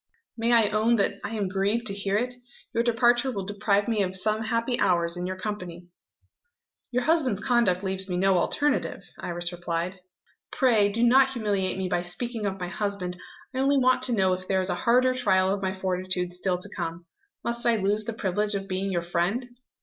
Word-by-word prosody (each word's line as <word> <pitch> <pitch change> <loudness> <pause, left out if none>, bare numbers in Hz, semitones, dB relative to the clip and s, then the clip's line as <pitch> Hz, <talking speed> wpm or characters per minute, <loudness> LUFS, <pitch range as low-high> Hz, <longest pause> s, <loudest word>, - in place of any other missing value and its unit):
"May 230 +1 0
I 230 -3 +5
own 220 +3 +2
that 200 -2 0
I 220 - -4
am 205 -3 -1
grieved 200 +5 0
to 200 - +2
hear 200 0 -1
it? 250 +3 -1 0.4
Your 230 - +2
departure 240 +2 +3
will 195 -5 -4
deprive 205 0 0
me 225 -3 +1
of 190 -1 -1
some 215 +3 0
happy 230 +2 -1
hours, 170 -1 +2
in 175 0 -3
your 185 - -3
company." 180 -3 -6 1.0
"Your 250 0 0
husband's 285 - +2
conduct 215 -7 +2
leaves 190 0 -3
me 180 - -1
no 190 0 +3
alternative," 290 +10 0 0.2
Iris 175 0 -2
replied. 175 +1 -3 0.5
"Pray 220 -6 +3
do 230 +3 0
not 260 +3 +6
humiliate 200 -6 -1
me 190 -1 -2
by 175 - 0
speaking 215 +5 -2
of 195 0 -4
my 180 - -3
husband! 185 -1 -3 0.4
I 260 - -3
only 275 +1 +3
want 255 -1 +3
to 250 - +1
know 190 -4 +2
if 185 0 -5
there 190 -1 +1
is 185 0 0
a - - +1
harder 255 +1 +3
trial 190 -7 +2
of 200 - -3
my 190 -1 -1
fortitude 185 -1 -2
still 180 0 0
to 180 - -2
come. 165 +1 -5 0.4
Must 235 0 -2
I 235 - +4
lose 210 +1 +1
the 230 - -3
privilege 205 0 -1
of 195 0 -4
being 195 0 -2
your 175 -2 -1
friend?" 175 +9 -1
200 Hz, 205 wpm, -26 LUFS, 185-235 Hz, 1.0 s, not